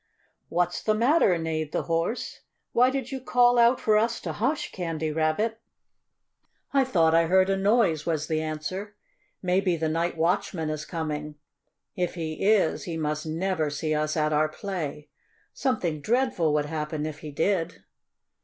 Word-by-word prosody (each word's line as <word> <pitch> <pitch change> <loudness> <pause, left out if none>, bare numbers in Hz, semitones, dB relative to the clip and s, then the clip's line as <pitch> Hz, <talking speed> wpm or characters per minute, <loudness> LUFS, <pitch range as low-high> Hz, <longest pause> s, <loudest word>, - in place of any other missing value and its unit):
"What's 175 +1 0
the 215 - +1
matter?" 235 - +4
neighed 160 -2 -3
the - - 0
Horse. 165 +8 -2 0.3
"Why 250 +2 +4
did 265 -1 -3
you 265 - -3
call 245 -1 +4
out 235 +2 +5
for 215 -1 +3
us 230 +1 0
to - - -4
hush, 270 +8 -1
Candy 165 -3 -3
Rabbit?" 160 +9 0 1.1
"I 275 -1 +4
thought 170 -11 +3
I 165 0 +4
heard 190 +2 +4
a - - +2
noise," 195 -5 +2
was 155 -3 -1
the 155 -1 -1
answer. 170 +7 -5 0.5
"Maybe 180 -1 +1
the 160 0 -1
night 165 +2 -1
watchman 165 -1 0
is 155 0 -4
coming. 150 -3 -4 0.6
If 180 -1 -2
he 160 -2 -4
is, 210 0 +3
he 165 -2 -4
must 150 0 -2
never 165 -1 -1
see 155 +2 -2
us 155 +1 -1
at 155 0 +1
our 155 +1 +2
play. 155 -5 -5 0.4
Something 180 - -1
dreadful 230 - +1
would 150 -1 +1
happen, 150 0 -3
if 155 -1 -5
he 155 - -8
did." 165 +3 -1
165 Hz, 165 wpm, -26 LUFS, 155-210 Hz, 1.1 s, out